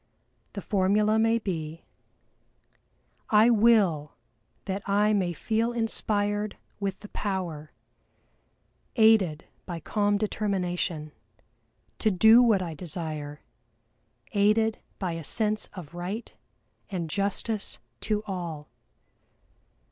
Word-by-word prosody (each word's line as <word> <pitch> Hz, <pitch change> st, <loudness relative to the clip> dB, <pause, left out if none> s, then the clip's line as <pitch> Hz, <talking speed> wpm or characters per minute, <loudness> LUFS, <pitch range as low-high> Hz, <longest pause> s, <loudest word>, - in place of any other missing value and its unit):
The 200 Hz, -, -6 dB
formula 210 Hz, +2 st, +2 dB
may 225 Hz, +1 st, +3 dB
be: 165 Hz, -7 st, -4 dB, 1.5 s
"I 220 Hz, +2 st, +6 dB
will 205 Hz, -10 st, +3 dB, 0.5 s
that 195 Hz, 0 st, -3 dB
I 210 Hz, +2 st, +3 dB
may 185 Hz, -4 st, +1 dB
feel 225 Hz, +7 st, -1 dB
inspired 210 Hz, -2 st, -1 dB, 0.2 s
with 195 Hz, -1 st, -3 dB
the 210 Hz, -, -9 dB
power, 175 Hz, -7 st, -4 dB, 1.2 s
aided 215 Hz, -9 st, +4 dB, 0.2 s
by 175 Hz, -3 st, -4 dB
calm 205 Hz, +4 st, +1 dB
determination, 180 Hz, -6 st, -2 dB, 0.9 s
to 220 Hz, -, +3 dB
do 220 Hz, +5 st, +7 dB
what 220 Hz, -6 st, +4 dB
I 170 Hz, -2 st, -5 dB
desire, 155 Hz, -3 st, -6 dB, 0.9 s
aided 215 Hz, +2 st, +2 dB, 0.2 s
by 185 Hz, -3 st, -2 dB
a 165 Hz, -1 st, -5 dB
sense 215 Hz, +6 st, 0 dB
of 175 Hz, -6 st, -9 dB
right 185 Hz, +6 st, -5 dB, 0.6 s
and 175 Hz, -4 st, -3 dB
justice 200 Hz, -, -2 dB, 0.2 s
to 210 Hz, -1 st, -1 dB
all. 170 Hz, -7 st, -5 dB
200 Hz, 100 wpm, -27 LUFS, 175-215 Hz, 1.5 s, do